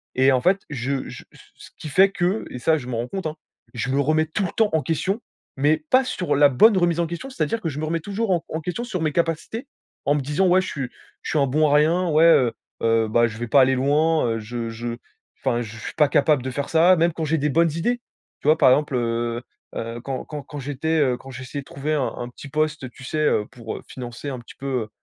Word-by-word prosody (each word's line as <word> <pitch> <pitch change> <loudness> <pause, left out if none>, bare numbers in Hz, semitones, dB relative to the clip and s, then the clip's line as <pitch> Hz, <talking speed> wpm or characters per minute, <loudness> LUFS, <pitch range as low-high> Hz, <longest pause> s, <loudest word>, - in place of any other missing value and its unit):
Et 130 +1 +5
en 130 - +2
fait, 190 +5 +3
je 135 -1 -2
je - - -9
c - - -18 0.2
ce - - -14
qui 155 - -7
fait 190 +6 +5
que 185 +3 -1
et 125 - -6
ça, 160 +5 +3
je 125 -5 -7
m'en 120 -2 -3
rends 120 +1 -2
compte, 190 +3 -4
hein, 155 - -5 0.4
je 120 +1 -3
me 135 - +1
remets 155 +3 +2
tout 165 +5 -2
le 175 - -3
temps 220 -2 +2
en 160 - +3
question, 190 - -1 0.4
mais 145 +3 +3
pas 255 +1 +6
sur 185 -7 -1
la 145 0 +6
bonne 200 - +5
remise 175 -2 +2
en 170 - +1
question, 170 +11 -6
c'est-à-dire 225 - -2
que 165 - -2
je 145 -1 -6
me 155 - -2
remets 165 +2 -1
toujours 205 +4 -2
en 170 -2 +1
en 160 - -3
question 180 +9 -3
sur 185 -8 -4
mes 155 -1 +1
capacités, 170 - -2 0.4
en 145 - +3
me 145 - 0
disant: 150 +8 +1
«Ouais 185 +1 +5
je - - -5
suis 135 -4 -4 0.3
je - - -5
suis 155 - +2
un 140 - +3
bon 150 +3 +2
à 145 - +4
rien, 165 +5 +3
ouais, 155 +1 +4
heu 130 -8 +5 0.3
heu, 115 -1 +3
bah 120 +2 +4
je 110 -1 -8
vais 120 +1 -4
pas 140 +4 +5
aller 130 0 +4
loin, 150 +4 +2
heu, 115 -1 -1
je 115 +1 -5
je 115 +1 -5 0.4
enfin 120 -3 0
je 110 -1 -7
suis 115 - -7
pas 150 - +4
capable 145 -1 +3
de 130 - -3
faire 140 +2 -3
ça» 170 +3 +5
même 170 +1 +2
quand 165 - -4
j'ai 160 +2 +1
des 150 +2 +1
bonnes 165 +3 +3
idées. 210 +11 -1 0.4
Tu - - -5
vois? 155 - +6
Par - - +6
exemple, 145 0 +2
heu, 120 0 -1 0.3
heu, 115 +1 -5
quand 130 +1 -4
quand 150 -1 -6
quand 145 +1 -8
j'étais, 145 +4 -1
heu, 130 -4 +3
quand 135 - -13
j'essayais 130 +3 -6
de - - -17
trouver 140 +3 -3
un 145 -4 0
un 120 - -4
petit 140 +3 -11
poste, 155 0 -1
heu, - - -7
tu 125 +2 -15
sais, 155 - -3
heu, 150 -8 +2
pour, 115 -3 -7
heu, - - -10
financer 125 +2 -7
un 130 -2 -5
petit 120 - -14
peu, 130 -5 -3
145 Hz, 270 wpm, -23 LUFS, 125-165 Hz, 0.4 s, pas